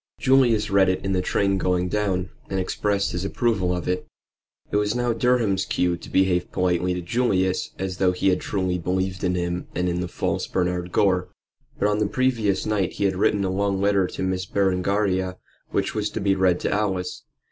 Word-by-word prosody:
Julius 125 Hz, -6 st, +3 dB
read 95 Hz, -1 st, +4 dB
it 95 Hz, +1 st, -1 dB
in 95 Hz, -, 0 dB
the 95 Hz, -1 st, +1 dB
train 100 Hz, +1 st, +1 dB
going 90 Hz, 0 st, +1 dB
down 95 Hz, -2 st, -1 dB, 0.2 s
and 95 Hz, -, -1 dB
expressed 100 Hz, +2 st, 0 dB
his 90 Hz, +1 st, -3 dB
approval 100 Hz, -3 st, 0 dB
of 90 Hz, -1 st, -3 dB
it. 90 Hz, 0 st, -1 dB, 0.6 s
It -, -, +2 dB
was 105 Hz, +2 st, +1 dB
now 120 Hz, -1 st, +1 dB
Durham's 115 Hz, -5 st, +2 dB
cue 90 Hz, -1 st, 0 dB
to 85 Hz, -, -11 dB
behave 95 Hz, -2 st, +1 dB
politely 90 Hz, 0 st, +1 dB
to 90 Hz, -, -4 dB
Julius, 95 Hz, -3 st, 0 dB
and 95 Hz, -, -2 dB
as 95 Hz, -1 st, -5 dB
though 95 Hz, -1 st, +3 dB
he 90 Hz, +1 st, +2 dB
truly 95 Hz, -3 st, -2 dB
believed 95 Hz, +2 st, -2 dB
in 90 Hz, -1 st, +1 dB
him 90 Hz, 0 st, -2 dB
and 90 Hz, -, 0 dB
in 90 Hz, 0 st, -1 dB
the 90 Hz, -, -2 dB
false -, -, -2 dB
Bernard 90 Hz, -1 st, -1 dB
Gore. 90 Hz, -2 st, +2 dB, 0.5 s
But 100 Hz, -, +2 dB
on 105 Hz, 0 st, +1 dB
the 105 Hz, -, +2 dB
previous 115 Hz, -5 st, 0 dB
night 105 Hz, -4 st, 0 dB
he -, -, -3 dB
had 95 Hz, -1 st, +2 dB
written 100 Hz, +1 st, +2 dB
a 95 Hz, -, 0 dB
long 100 Hz, 0 st, 0 dB
letter 100 Hz, -1 st, +2 dB
to -, -, -5 dB
Miss 95 Hz, 0 st, -1 dB
Berengaria, 95 Hz, -1 st, 0 dB, 0.3 s
which -, -, -1 dB
was 105 Hz, -1 st, -1 dB
to -, -, -4 dB
be 100 Hz, -1 st, +2 dB
read 95 Hz, -2 st, +2 dB
to -, -, -1 dB
Alice. 95 Hz, -3 st, -1 dB
95 Hz, 200 wpm, -24 LUFS, 90-100 Hz, 0.6 s, read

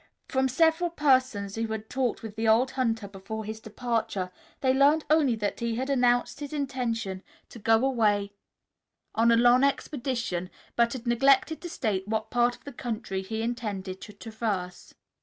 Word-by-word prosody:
From 265 Hz, 0 st, +1 dB
several 325 Hz, +5 st, +3 dB
persons 255 Hz, -10 st, +2 dB
who 225 Hz, +1 st, -2 dB
had 220 Hz, 0 st, -5 dB
talked 250 Hz, -2 st, -1 dB
with 215 Hz, -2 st, -7 dB
the 225 Hz, 0 st, -1 dB
old 235 Hz, +4 st, +4 dB
hunter 225 Hz, -5 st, -1 dB
before 200 Hz, +3 st, -7 dB
his 220 Hz, +1 st, -5 dB
departure, 220 Hz, -4 st, -2 dB, 0.3 s
they 260 Hz, -1 st, +3 dB
learned 285 Hz, +4 st, +4 dB
only 295 Hz, -6 st, +4 dB
that 210 Hz, -2 st, -3 dB
he 235 Hz, -1 st, -1 dB
had 260 Hz, +4 st, -2 dB
announced 245 Hz, -1 st, +2 dB
his 290 Hz, 0 st, -6 dB
intention 235 Hz, -9 st, -2 dB, 0.3 s
to 235 Hz, -, -11 dB
go 225 Hz, +3 st, +3 dB
away 210 Hz, -6 st, +1 dB, 0.8 s
on 230 Hz, +1 st, +4 dB
a 230 Hz, -, +5 dB
long 245 Hz, +2 st, +5 dB
expedition, 240 Hz, -, -1 dB, 0.3 s
but 235 Hz, 0 st, +3 dB
had 255 Hz, -2 st, -7 dB
neglected 270 Hz, +5 st, +3 dB
to 350 Hz, -, -6 dB
state 205 Hz, -, -2 dB
what 220 Hz, 0 st, -2 dB
part 245 Hz, 0 st, +2 dB
of -, -, -23 dB
the 285 Hz, -, -9 dB
country 220 Hz, -6 st, -4 dB
he 220 Hz, +3 st, -4 dB
intended 205 Hz, -6 st, -4 dB
to -, -, -9 dB
traverse. 205 Hz, -4 st, -5 dB
235 Hz, 170 wpm, -27 LUFS, 215-260 Hz, 0.8 s, a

